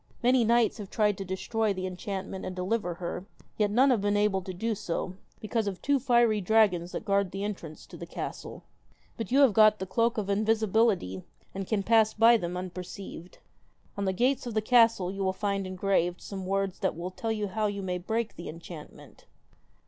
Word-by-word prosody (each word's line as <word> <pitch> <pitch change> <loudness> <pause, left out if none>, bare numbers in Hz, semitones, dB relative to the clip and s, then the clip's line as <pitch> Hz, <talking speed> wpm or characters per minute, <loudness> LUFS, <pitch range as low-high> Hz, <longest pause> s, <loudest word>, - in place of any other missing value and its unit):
Many 250 0 +4
knights 235 0 +2
have 200 -2 -7
tried 210 -2 +2
to - - -2
destroy 205 +3 -1
the 185 -1 -4
enchantment 190 +1 -5
and 185 - -5
deliver 185 -1 -1
her, 180 +2 -5 0.3
yet 210 -1 +2
none 260 +6 +4
have 235 -5 +2
been 205 0 +1
able 205 -2 +2
to 185 - -6
do 220 +6 -2
so, 185 -3 -3 0.3
because 220 0 -1
of 190 -2 -3
two 285 -1 +1
fiery 235 -4 +3
dragons 185 -4 +3
that - - -5
guard 200 -2 +2
the 195 +2 -5
entrance 180 -7 -6
to - - -12
the - - -8
castle. - - -7 0.5
But 225 -2 -5
you 275 +2 +5
have 265 -6 +6
got 215 0 +6
the 190 - -4
cloak 230 +5 +1
of 210 -3 -2
invisibility, 215 - +1 0.3
and 195 -1 -5
can 210 -3 0
pass 220 0 +4
them - - -30
by 230 +2 +7
unperceived. 180 0 -7 0.6
On 200 - -2
the 190 - +1
gates 250 +5 +1
of 230 - -5
the 215 - +2
castle 230 -6 +4
you 195 0 -4
will 190 0 +1
find 195 -1 -2
engraved 185 -2 0
some 190 -2 -7
words 195 -1 -1
that - - -1
will 175 +2 -5
tell 225 +4 -3
you 210 -2 -2
how 215 +2 0
you 200 -1 -4
may 180 -1 -2
break 220 +4 -2
the 170 - -7
enchantment.' 165 -1 -11
200 Hz, 200 wpm, -28 LUFS, 185-225 Hz, 0.6 s, by